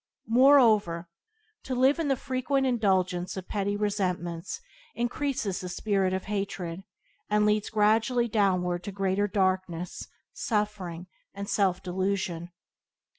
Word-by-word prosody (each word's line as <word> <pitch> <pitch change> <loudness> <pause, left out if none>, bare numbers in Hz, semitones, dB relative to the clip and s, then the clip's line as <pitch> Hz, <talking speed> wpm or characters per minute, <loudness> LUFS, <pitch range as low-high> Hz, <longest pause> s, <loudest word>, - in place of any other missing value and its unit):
Moreover, 225 -10 +5 0.5
to 260 - -4
live 265 +5 +4
in 325 - 0
the 270 - +2
frequent 265 +1 -1
indulgence 190 -7 +1
of 185 - -6
petty 205 0 -1
resentments 180 - -2 0.4
increase 250 +3 -1
the 185 -3 -3
spirit 195 0 0
of 190 0 -2
hatred, 190 -4 -3 0.5
and 210 0 +3
leads 210 0 +1
gradually 225 +3 +2
downward 185 -5 +1
to 200 - -4
greater 195 +1 0
darkness, 185 -3 -1 0.3
suffering, 205 -6 -2 0.3
and 200 0 -5
self 190 -3 +1
delusion. 185 -2 -2
200 Hz, 120 wpm, -28 LUFS, 185-220 Hz, 0.5 s, Moreover